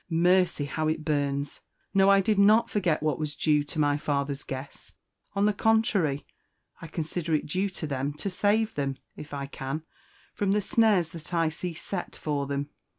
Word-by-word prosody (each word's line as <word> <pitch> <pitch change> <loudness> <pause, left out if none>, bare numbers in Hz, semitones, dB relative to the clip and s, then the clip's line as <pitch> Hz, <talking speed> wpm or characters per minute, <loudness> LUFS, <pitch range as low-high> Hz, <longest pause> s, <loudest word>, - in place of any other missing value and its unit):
Mercy! 175 -2 +3
how 155 +2 -2
it 155 0 -1
burns! 145 -2 -1 0.3
No, 195 0 +5
I 195 0 +6
did 205 +1 +1
not 215 +3 +5
forget 180 -7 +1
what 155 -2 0
was 150 -1 -3
due 150 -2 +2
to 145 - -8
my 145 -1 +3
father's 140 -1 -1
guests; 135 +1 -8 0.4
on 200 +1 +3
the 210 - +3
contrary, 200 -10 +2 0.6
I 165 - -7
consider 160 0 -2
it 150 - -1
due 185 +6 -1
to 180 -3 -6
them 140 0 -2
to 150 - -5
save 210 +3 +1
them, 135 -2 -2 0.2
if 150 - -10
I 140 -1 -3
can, 140 +3 -5 0.5
from 200 -1 +1
the 210 - +2
snares 205 -6 +3
that 165 +1 -7
I 165 -1 +3
see 165 +2 -5
set 180 +2 -5
for 145 -2 -2
them. 140 +1 -2
160 Hz, 185 wpm, -27 LUFS, 145-195 Hz, 0.6 s, I